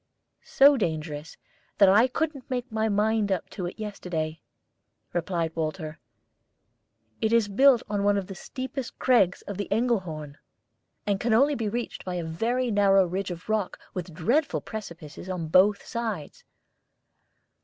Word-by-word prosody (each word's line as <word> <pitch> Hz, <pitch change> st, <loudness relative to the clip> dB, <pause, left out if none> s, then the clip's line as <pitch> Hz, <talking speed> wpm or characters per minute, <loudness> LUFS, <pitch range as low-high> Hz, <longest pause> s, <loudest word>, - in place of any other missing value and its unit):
"So 280 Hz, +1 st, +5 dB
dangerous 155 Hz, -5 st, -3 dB, 0.4 s
that 200 Hz, -, +7 dB
I 210 Hz, +6 st, +6 dB
couldn't 285 Hz, 0 st, -3 dB
make 250 Hz, -2 st, -2 dB
up 260 Hz, -, -35 dB
my 220 Hz, 0 st, 0 dB
mind 210 Hz, 0 st, +1 dB, 0.2 s
to 185 Hz, -, -4 dB
it -, -, -8 dB
yesterday," 175 Hz, -7 st, -4 dB, 0.7 s
replied 170 Hz, -1 st, -1 dB
Walter. 155 Hz, -1 st, -3 dB, 1.2 s
"It 220 Hz, -, +1 dB
is 230 Hz, -2 st, +4 dB
built 250 Hz, +4 st, +5 dB
on 205 Hz, -1 st, -1 dB
one 205 Hz, 0 st, +3 dB
of 195 Hz, -, -2 dB
the 195 Hz, -, -8 dB
steepest 260 Hz, +5 st, -6 dB
crags 215 Hz, -9 st, +3 dB
of 200 Hz, -, -6 dB
the 205 Hz, -, -3 dB
Engelhorn, 185 Hz, -, -1 dB, 0.7 s
and 200 Hz, -2 st, 0 dB
can 225 Hz, 0 st, +2 dB
only 280 Hz, +5 st, +4 dB
be 225 Hz, -6 st, -2 dB
reached 235 Hz, +2 st, -4 dB
by 180 Hz, -1 st, -4 dB
a 175 Hz, -, -2 dB
very 230 Hz, +10 st, -1 dB
narrow 195 Hz, -2 st, +5 dB
ridge 190 Hz, +2 st, -3 dB
of 175 Hz, -1 st, -7 dB
rock 215 Hz, -3 st, -1 dB, 0.2 s
with 180 Hz, -1 st, -5 dB
dreadful 240 Hz, -, +1 dB
precipices 175 Hz, -5 st, -8 dB
on 175 Hz, -4 st, -3 dB
both 200 Hz, +4 st, +4 dB
sides." 225 Hz, -, -5 dB
200 Hz, 150 wpm, -26 LUFS, 175-230 Hz, 1.2 s, that